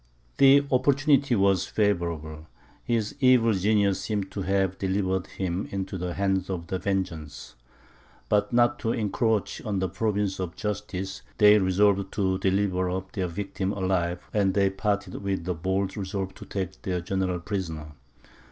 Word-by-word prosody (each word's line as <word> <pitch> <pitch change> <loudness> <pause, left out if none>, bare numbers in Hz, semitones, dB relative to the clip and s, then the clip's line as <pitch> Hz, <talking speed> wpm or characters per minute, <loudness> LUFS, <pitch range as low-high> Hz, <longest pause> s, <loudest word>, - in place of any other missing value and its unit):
The 140 +1 +6
opportunity 135 0 +3
was 95 -3 +2
favourable; 85 -7 -1 0.4
his 115 -3 -1
evil 125 -4 +5
genius 100 0 +2
seemed 100 -3 -3
to 100 - -4
have 95 0 0
delivered 95 -1 0
him 95 0 -3
into 95 0 -4
the 90 -1 -3
hands 95 -1 0
of 90 -3 -3
vengeance. 90 -5 -3 0.7
But 105 0 +1
not 120 0 +3
to 115 - 0
encroach 110 0 0
on 105 -3 -2
the 95 0 0
province 100 +1 -1
of 90 -2 -4
justice, 95 -2 -4 0.2
they 105 0 +7
resolved 100 +1 +2
to 95 -2 0
deliver 95 -1 +1
up 95 +1 -4
their 95 -5 -2
victim 95 +2 -3
alive; 90 -3 -1
and 100 -3 +2
they 100 -1 +3
parted 100 -1 -2
with 95 -3 -2
the 90 - -1
bold 95 +3 -1
resolve 95 -1 -4
to - - -11
take 95 -1 -4
their 90 -2 -2
general 95 0 -1
prisoner. 80 -5 -4
95 Hz, 150 wpm, -26 LUFS, 95-105 Hz, 0.7 s, they